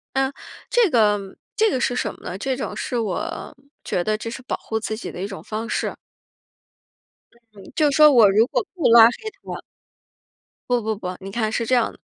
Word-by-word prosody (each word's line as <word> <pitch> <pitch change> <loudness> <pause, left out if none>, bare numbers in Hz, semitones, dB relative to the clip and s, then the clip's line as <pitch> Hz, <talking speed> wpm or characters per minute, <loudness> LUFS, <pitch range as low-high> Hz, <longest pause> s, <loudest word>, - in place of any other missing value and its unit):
嗯， 270 0 +1 0.4
这 480 -4 +4
个 205 -5 +1 0.2
这 440 -1 +3
个 260 - -1
是 245 - 0
什 215 - -1
么 - - -20
呢？ 180 - -5
这 265 +4 -2
种 260 - -5
是 245 - -3
我 230 - -4 0.3
觉 175 - -1
得 215 +4 0
这 230 +2 -6
是 260 +2 -8
保 255 - -3
护 220 - -4
自 220 0 -3
己 225 - -6
的 - - -8
一 195 - -2
种 195 -1 -8
方 220 +2 -5
式。 - - -2 1.6
嗯。 200 - -13
就 300 -2 +3
说 300 +2 +7
我 225 -6 +7
如 215 +4 +4
果 390 - -1
不 350 - +1
拉 230 -1 +9
黑 235 - +3 0.3
他 - - -6 1.1
不 245 -1 +2
不 220 0 -1
不， 185 -3 -6
你 195 0 -8
看 220 0 -1
是 230 +1 -1
这 255 +3 +1
样 240 -2 +2
的， - - -18
230 Hz, 225 characters per minute, -22 LUFS, 210-260 Hz, 1.6 s, 拉